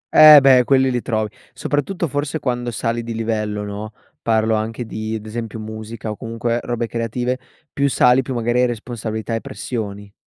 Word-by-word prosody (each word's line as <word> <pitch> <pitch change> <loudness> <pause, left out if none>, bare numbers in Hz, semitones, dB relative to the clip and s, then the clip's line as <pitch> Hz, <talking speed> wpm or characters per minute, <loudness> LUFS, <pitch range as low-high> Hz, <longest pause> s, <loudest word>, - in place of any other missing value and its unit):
Eh 155 -1 +11
beh 130 -2 +6
quelli 130 0 +3
li 125 -1 -1
trovi, 110 -3 -1 0.2
soprattutto 170 +5 -1
forse 145 +2 -2
quando 120 -3 -2
sali 115 0 -2
di 115 0 -5
livello 105 -2 -2
no, 105 +1 -6 0.3
parlo 110 -1 +2
anche 110 +2 -2
di, 110 0 -4
ad 110 -1 -6
esempio, 110 0 -5
musica 110 0 -6
o - - -5
comunque 115 +1 -2
robe 120 -1 -2
creative, 120 +2 -2 0.3
più 140 0 +1
sali 125 0 +4
più 130 0 -5
magari 120 +1 +1
hai 125 - +4
responsabilità 115 -1 -4
e 115 - -1
pressioni. 105 -7 -6
115 Hz, 175 wpm, -20 LUFS, 110-125 Hz, 0.3 s, Eh